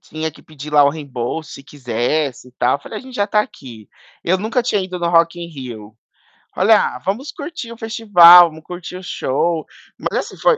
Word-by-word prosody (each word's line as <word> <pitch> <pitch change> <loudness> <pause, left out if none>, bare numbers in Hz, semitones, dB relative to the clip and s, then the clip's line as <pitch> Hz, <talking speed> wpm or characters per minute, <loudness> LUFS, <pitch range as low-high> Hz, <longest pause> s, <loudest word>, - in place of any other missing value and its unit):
Tinha 160 +1 -5
que - - -18
pedir 150 -1 -11
lá 145 -1 +6
o 140 - +4
reembolso 145 0 -5
se 140 - -10
quisesse 130 0 -3
e - - -22
tal. 125 +2 +1
Eu - - -20
falei: 215 - -7
"A - - -10
gente 260 -1 -12
já 205 - +1
está 210 +1 +2
aqui". 125 - -9 0.4
Eu 185 +2 +2
nunca 225 +4 -1
tinha 210 -4 0
ido 185 -1 -6
no 170 0 -1
Rock 170 0 +3
in 170 - -6
Rio, 120 -8 -9 0.6
olha: - - +3
"Ah, - - -8
vamos 230 - -3
curtir 290 -6 -7
o 230 - -10
festival, 180 -7 +7
vamos 160 0 -14
curtir 180 0 -8
o 185 - -11
show". 165 0 -1 0.3
Mas - - -2
assim, - - -7
foi - - +3
170 Hz, 215 wpm, -18 LUFS, 140-205 Hz, 0.6 s, festival